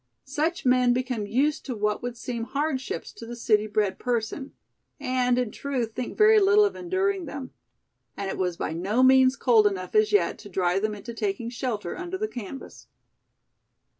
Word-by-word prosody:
Such 300 +4 -2
men 250 -1 +4
become 250 -4 -2
used 275 +8 +1
to 255 - -3
what 210 0 -1
would 245 0 -5
seem 235 -1 -4
hardships 275 -1 -3
to 230 - -10
the 240 - -6
city 215 -3 +2
bred 210 -2 0
person, 245 +3 -2 0.5
and 255 -2 +1
in 250 -4 0
truth 255 -5 -3
think 250 +1 -5
very 430 0 +7
little 410 +1 +5
of 405 - -2
enduring 375 +1 -1
them. 275 -3 -7 0.7
And 200 - -3
it - - -3
was 180 -2 -1
by - - -3
no 200 +9 +1
means 260 0 +6
cold 225 -6 +4
enough 185 -3 -4
as 215 0 +3
yet, 190 -5 +2
to 205 - -11
drive 180 0 +1
them 215 0 -1
into 235 +3 -8
taking 225 +1 -3
shelter 230 -7 -3
under 365 +1 -5
the 430 +2 -1
canvas. 250 - -9
245 Hz, 180 wpm, -26 LUFS, 210-275 Hz, 0.7 s, very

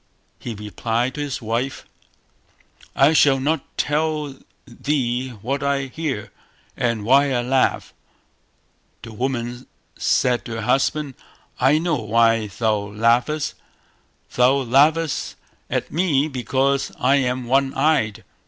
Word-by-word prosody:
He 115 - -6
replied 115 +4 -2
to 150 - -5
his 140 -5 -4
wife 115 +5 -2 1.1
"I 140 +4 +5
shall 140 -3 +4
not 145 +2 0
tell 150 -1 -1 0.3
thee 130 -1 -2
what 135 +4 -2
I 140 -1 0
hear, 135 -4 -4 0.4
and 115 -4 -1
why 135 +4 +4
I 120 -2 0
laugh". 130 +1 0 1.1
The 115 - -9
woman 120 0 -3 0.3
said 125 -1 +1
to 115 - -6
her 115 - -4
husband 135 +4 0 0.5
"I 135 +4 +4
know 165 -1 0
why 115 0 +2
thou 110 +2 0
laughest; 115 +8 0 0.8
thou 125 +1 +4
laughest 150 +5 +2 0.3
at - - -2
me 155 -4 +1
because 135 +1 0
I 135 +3 +3
am 125 -2 -1
one 135 +2 +2
eyed". 135 -8 +1
130 Hz, 120 wpm, -21 LUFS, 120-140 Hz, 1.1 s, I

